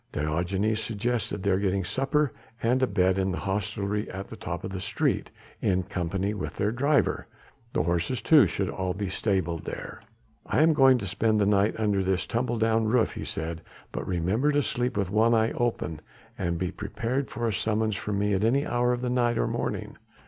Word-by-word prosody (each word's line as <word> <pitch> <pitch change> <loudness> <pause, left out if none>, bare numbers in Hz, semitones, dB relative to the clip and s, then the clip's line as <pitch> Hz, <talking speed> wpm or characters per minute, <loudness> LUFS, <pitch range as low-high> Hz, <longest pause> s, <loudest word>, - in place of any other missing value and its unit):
Diogenes 90 +8 0
suggested 110 -2 -2
their 95 -1 +2
getting 100 -1 0
supper 135 - 0 0.3
and 125 +3 +2
a 130 - +4
bed 95 -2 +2
in 95 0 +1
the 90 - -3
hostelry 105 +1 -2
at 95 +2 -6
the - - -7
top - - -5
of - - -4
the 95 -1 -4
street - - 0 0.3
in 95 -1 +2
company 95 +2 -2
with 105 - -5
their 105 +1 0
driver; 140 +4 +1 0.5
the - - +2
horses 85 +8 0
too 145 - +6
should 95 +3 -2
all 95 0 -2
be 100 -1 -3
stabled 95 -5 -1
there. - - -6 0.4
"I 155 - +2
am 160 0 +5
going 135 -3 +6
to 105 - -4
spend 110 +3 +1
the 100 - +3
night 100 +1 +3
under 105 -3 +1
this 95 -2 0
tumble 120 0 -1
down 110 0 +2
roof," 115 +1 +2
he - - -5
said, 80 +1 -4 0.3
"but - - -4
remember 95 - +1
to 145 0 +3
sleep 125 -2 -1
with 100 -2 0
one 115 +2 +4
eye 110 0 +2
open 115 -10 -1 0.4
and 85 0 -1
be 90 +1 -2
prepared 115 +6 -3
for 120 -1 -2
a 110 - 0
summons 110 +2 0
from 105 -1 -3
me 105 0 +1
at 95 +1 +1
any 135 +6 +3
hour 120 0 +1
of 120 - -3
the 125 - 0
night 120 -2 +2
or - - +2
morning. - - -3
105 Hz, 200 wpm, -27 LUFS, 95-120 Hz, 0.5 s, too